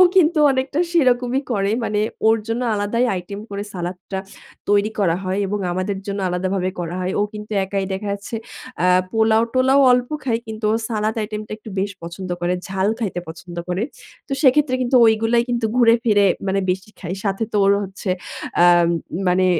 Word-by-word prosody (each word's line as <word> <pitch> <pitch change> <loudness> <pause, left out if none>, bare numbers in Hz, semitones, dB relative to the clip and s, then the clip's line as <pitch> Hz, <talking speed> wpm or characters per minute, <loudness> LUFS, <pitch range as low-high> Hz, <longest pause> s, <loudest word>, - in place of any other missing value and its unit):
কিন্তু 340 -2 +4
অনেকটা 265 +4 -1
সেরকমই 255 -5 +2
করে। 200 -2 +1
মানে 210 -2 0 0.3
ওর 225 +1 +5
জন্য 230 +2 -1
আলাদাই 210 +4 0
আইটেম 190 +3 -6
করে 200 0 -4
সালাদটা 180 +2 -5 0.5
তৈরি 205 +1 +3
করা 175 -4 +2
হয় 185 +1 -1
এবং 205 +1 -2
আমাদের 185 +2 -2
জন্য 200 0 -3
আলাদাভাবে 185 +1 -1
করা 175 +1 -3
হয়। 180 - -1
ও - - +3
কিন্তু 210 0 -8
একাই 195 0 -2
দেখা 205 +2 -4
যাচ্ছে 200 +3 -6 0.5
আ 180 - +4 0.2
পোলাও-টোলাও 230 +5 +3
অল্প 250 0 +2
খায়। 230 -3 0
কিন্তু 220 0 -5
ও - - +3
সালাদ 215 0 -1
আইটেমটা 215 0 -5
একটু 220 - -11
বেশ 200 +1 -1
পছন্দ 180 +2 -7
করে। 175 +1 +1
ঝাল 190 +1 0
খাইতে 200 -6 -2
পছন্দ 170 +2 -10
করে। 180 +3 -1 0.5
তো 280 - -13
সেক্ষেত্রে 280 -1 +4
কিন্তু 250 +1 +1
ঐগুলাই 225 +1 +3
কিন্তু 240 -2 0
ঘুরে 230 -2 +6
ফিরে 205 -3 +4 0.2
মানে 195 +1 +1
বেশি 190 +3 -5
খায়। 185 +3 -4
সাথে 195 +2 -1
তো 210 - +2
ওর 200 - +5
হচ্ছে 190 0 -7 0.5
আম 175 -1 +6 0.4
মানে 185 +1 +3
205 Hz, 175 wpm, -21 LUFS, 190-230 Hz, 0.5 s, ঘুরে